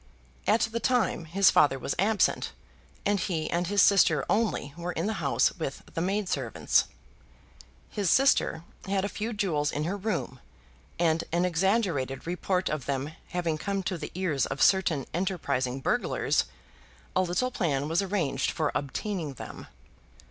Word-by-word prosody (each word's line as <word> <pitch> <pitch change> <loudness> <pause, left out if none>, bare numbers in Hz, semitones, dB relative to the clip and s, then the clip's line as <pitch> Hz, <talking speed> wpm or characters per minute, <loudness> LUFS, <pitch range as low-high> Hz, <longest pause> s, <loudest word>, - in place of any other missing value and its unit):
At 220 +2 +4
the 225 +1 0
time 245 -9 +1
his 190 +5 +4
father 140 -2 +4
was 135 - -2
absent, 210 +2 +2 0.5
and 205 0 +2
he 165 -3 -1
and 175 +1 0
his 200 0 +4
sister 165 -7 +4
only 210 -9 0
were 175 +1 -4
in 165 - -2
the 220 - 0
house 140 - +3
with 140 -4 -4
the 165 - -2
maid 195 +3 0
servants. 130 -9 +1 1.0
His 200 -4 -1
sister 270 - +3 0.2
had 195 0 0
a - - 0
few 215 +2 -4
jewels 170 -9 0
in 150 - -2
her 175 +5 -1
room, 200 - -3 0.6
and 165 -1 +2
an 175 +2 +2
exaggerated 175 - 0
report 180 +2 -1
of 150 -4 -3
them 140 +1 -2 0.2
having 170 -3 -2
come 195 +1 -2
to 185 -1 -2
the 150 - -5
ears 165 -8 0
of 135 - -5
certain 170 -8 +3
enterprising 140 -8 -1
burglars, - - +1 0.7
a 185 - +4
little 185 +8 0
plan 145 - 0
was 165 +4 +1
arranged 175 -10 0
for 155 -2 -1
obtaining 155 +1 -3
them. - - -9
175 Hz, 155 wpm, -28 LUFS, 150-200 Hz, 1.0 s, At